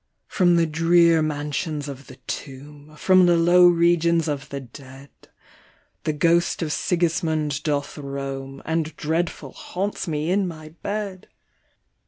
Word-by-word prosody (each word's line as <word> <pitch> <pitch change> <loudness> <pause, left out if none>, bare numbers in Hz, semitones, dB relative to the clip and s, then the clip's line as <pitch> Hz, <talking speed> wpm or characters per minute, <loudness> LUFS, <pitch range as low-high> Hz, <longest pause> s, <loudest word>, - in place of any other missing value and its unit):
" - - -51
From 175 -2 +3
the 170 -1 +3
drear 165 +1 +4
mansions 150 0 -3
of 140 -1 -9
the 130 - -12
tomb, 145 +2 -8
From 185 +1 +5
the 175 -1 +4
low 175 +2 +6
regions 170 -1 +3
of 145 -1 -4
the 140 - -5
dead, 135 +2 -13 0.9
The 155 - +1
ghost 170 +3 +2
of 160 - -3
Sigismnnd 160 -3 0
doth 145 -1 -2
roam, 135 -1 -6
And 160 -1 -2
dreadful 160 -3 -2
haunts 195 +1 -4
me 155 +1 -1
in 195 0 +1
my 155 -2 -8
bed 200 +3 -5
160 Hz, 140 wpm, -23 LUFS, 145-170 Hz, 0.9 s, low